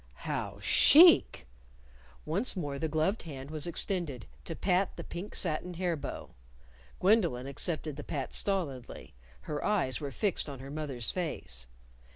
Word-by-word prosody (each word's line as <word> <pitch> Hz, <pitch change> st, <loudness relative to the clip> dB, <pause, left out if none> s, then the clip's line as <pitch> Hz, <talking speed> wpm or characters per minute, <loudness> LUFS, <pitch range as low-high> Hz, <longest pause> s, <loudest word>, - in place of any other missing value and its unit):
"How -, -, -3 dB
chic!" 330 Hz, -, +6 dB, 0.8 s
Once 195 Hz, +12 st, +2 dB
more 145 Hz, -6 st, -4 dB
the 160 Hz, -, -1 dB
gloved 160 Hz, +7 st, 0 dB
hand 140 Hz, -3 st, -8 dB
was 155 Hz, 0 st, +4 dB
extended 170 Hz, -, -2 dB, 0.2 s
to 165 Hz, -, -5 dB
pat 185 Hz, +2 st, 0 dB
the -, -, -5 dB
pink 180 Hz, +4 st, -7 dB
satin 175 Hz, +1 st, -1 dB
hair 175 Hz, -1 st, -1 dB
bow. 145 Hz, -, -7 dB, 0.7 s
Gwendolyn 180 Hz, -, +2 dB
accepted 150 Hz, +1 st, -2 dB
the 150 Hz, -, -6 dB
pat 140 Hz, -2 st, -4 dB
stolidly. 155 Hz, -11 st, -2 dB, 0.3 s
Her 150 Hz, -1 st, -4 dB
eyes 175 Hz, -11 st, +1 dB
were 145 Hz, -, -3 dB
fixed 180 Hz, +3 st, -1 dB
on 140 Hz, -, -7 dB
her 135 Hz, +2 st, -9 dB
mother's 145 Hz, -6 st, -3 dB
face. 65 Hz, -, -4 dB
155 Hz, 145 wpm, -30 LUFS, 140-185 Hz, 0.8 s, chic